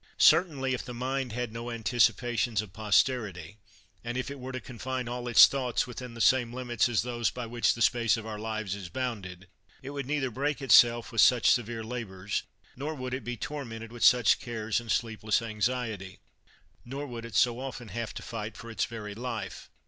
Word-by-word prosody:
Certainly, 140 -7 +4
if 125 - -3
the 125 -1 -8
mind 130 +1 -2
had 120 -1 -3
no 115 +1 -5
anticipations 120 0 +1
of 95 -4 -13
posterity, 105 - 0 0.4
and 120 +1 -3
if 130 +2 -3
it 140 - -7
were 130 +1 -6
to 130 - -4
confine 125 0 -5
all 120 0 -4
its 120 - +9
thoughts 130 -4 0
within 125 -1 -8
the - - -9
same 125 -2 +4
limits 120 -2 0
as 115 -3 +1
those 120 -2 0
by 125 -1 -6
which 120 +1 +1
the 115 - +1
space 115 -1 +3
of 110 - -7
our 110 -1 -5
lives 110 -3 -3
is 100 -4 -7
bounded, 100 -8 -5 0.4
it 135 - -6
would 140 -3 -5
neither 140 -3 -1
break 140 +3 -1
itself 120 -2 +5
with 115 -2 +3
such 120 +1 +6
severe 115 -1 0
labors, 105 -5 -4 0.3
nor 150 +5 -4
would 130 -2 -5
it 130 - -3
be 120 0 -4
tormented 115 -4 -6
with 120 -2 -5
such 125 -4 +6
cares 110 -2 -2
and 115 -2 -5
sleepless 110 -2 +1
anxiety, 110 -4 -3 0.6
nor 135 +4 -5
would 120 -4 -7
it 115 -2 -8
so 120 -1 +3
often 125 -3 -6
have 115 +3 -4
to - - -6
fight 110 -1 -6
for 115 0 -9
its 110 - 0
very 105 -3 -7
life. 115 +1 -5
120 Hz, 195 wpm, -29 LUFS, 110-125 Hz, 0.6 s, its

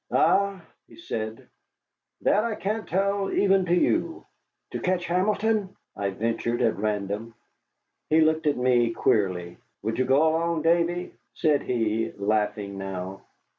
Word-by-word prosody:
"Ah," 200 0 +3 0.3
he - - -16
said, 110 -9 -5 0.7
"that 210 +2 +3
I 230 -2 -1
can't 215 +3 -3
tell 195 +1 0
even 195 -2 +3
to 175 - +3
you." 330 - 0 0.5
"To - - -3
catch 180 -1 0
Hamilton?" 205 +3 0 0.2
I 100 -1 -1
ventured 115 +4 -1
at 110 -6 +1
random. 105 +2 -2 0.7
He 160 +1 +5
looked 160 0 +2
at 145 - +2
me 120 -2 +2
queerly. 90 -6 0 0.3
"Would 110 +3 -2
you 130 - +2
go 135 +5 +4
along, 165 0 0
Davy?" 170 +1 +1 0.2
said 150 -3 +2
he, 115 -2 -1
laughing 105 -1 -1
now. 95 0 -5
135 Hz, 135 wpm, -26 LUFS, -, 0.7 s, He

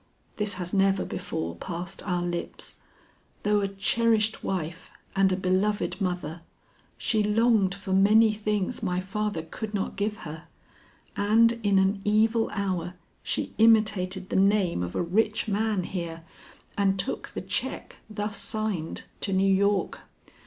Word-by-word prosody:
"This 210 -1 0
has 180 -2 -5
never 195 -1 +3
before 85 +1 -4
passed 175 - -5
our 180 -2 0
lips. 175 -1 -4 0.6
Though 210 0 +3
a 200 - 0
cherished 220 +2 +1
wife 175 -2 -3 0.3
and 195 -1 +4
a - - +2
beloved 190 +3 0
mother, 175 -3 -2 0.6
she 220 -2 +1
longed 210 -2 +3
for 195 -1 -4
many 215 +3 +5
things 210 +1 -1
my 180 -4 0
father 195 -2 -2
could 210 +6 -6
not 195 - -2
give 210 +2 -1
her, 155 +1 -8 0.7
and 220 +3 +4
in 200 -2 +3
an 190 +1 +2
evil 220 +2 +3
hour 185 -3 -2 0.3
she - - -2
imitated 205 -4 +3
the - - -2
name 195 - +3
of 90 0 -4
a - - +1
rich 210 +6 +1
man 210 -2 0
here 170 -3 -5 0.5
and 195 -1 +2
took 185 - -3
the - - -5
check - - -3
thus 210 0 -3
signed 215 -7 -2 0.2
to 200 - -2
New 195 +1 +3
York. 200 0 +1
195 Hz, 145 wpm, -27 LUFS, 185-210 Hz, 0.7 s, many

